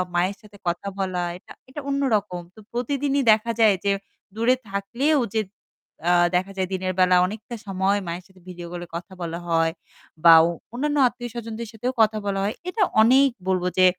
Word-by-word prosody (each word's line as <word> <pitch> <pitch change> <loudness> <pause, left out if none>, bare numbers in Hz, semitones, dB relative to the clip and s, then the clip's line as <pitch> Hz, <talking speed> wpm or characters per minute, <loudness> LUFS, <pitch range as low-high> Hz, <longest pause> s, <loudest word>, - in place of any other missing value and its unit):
মায়ের 185 +3 +1
সাথে 210 -1 -16
কথা 175 +3 -2
বলা 185 -2 -1
এটা - - -18 0.2
এটা 295 +2 -7
অন্যরকম। 215 -10 0
তো - - -14
প্রতিদিনই 275 +3 0
দেখা 220 +2 +2
যায় 215 -3 +6
যে 200 - +3 0.4
দূরে 235 +3 +3
থাকলেও 245 +10 0 0.2
যে 220 - +3 0.7
আ - - +5 0.2
দেখা 185 +2 0
যায় 185 -1 0
দিনের 185 0 -1
বেলা 185 0 +5
অনেকটা 220 +5 -6
সময় 195 +1 +1
মায়ের 175 +2 -4
সাথে 190 -1 -22
ভিডিও 175 -1 -8
কল 175 0 -6
এ - - -20
কথা 180 +3 -7
বলা 170 0 -4
হয় 165 -1 +2 0.5
বা 165 - +10
অ - - +2 0.3
অন্যান্য 295 +4 -1
আত্মীয়স্বজনদের 235 -2 -6
সাথেও 245 +3 -3
কথা 215 0 +3
বলা 195 -1 -1
হয়। 205 +2 0 0.2
এটা 410 +2 +1 0.2
অনেক 265 +5 +6 0.2
বলবো 185 -1 +1
যে 185 - +6
205 Hz, 180 wpm, -24 LUFS, 185-240 Hz, 0.7 s, বা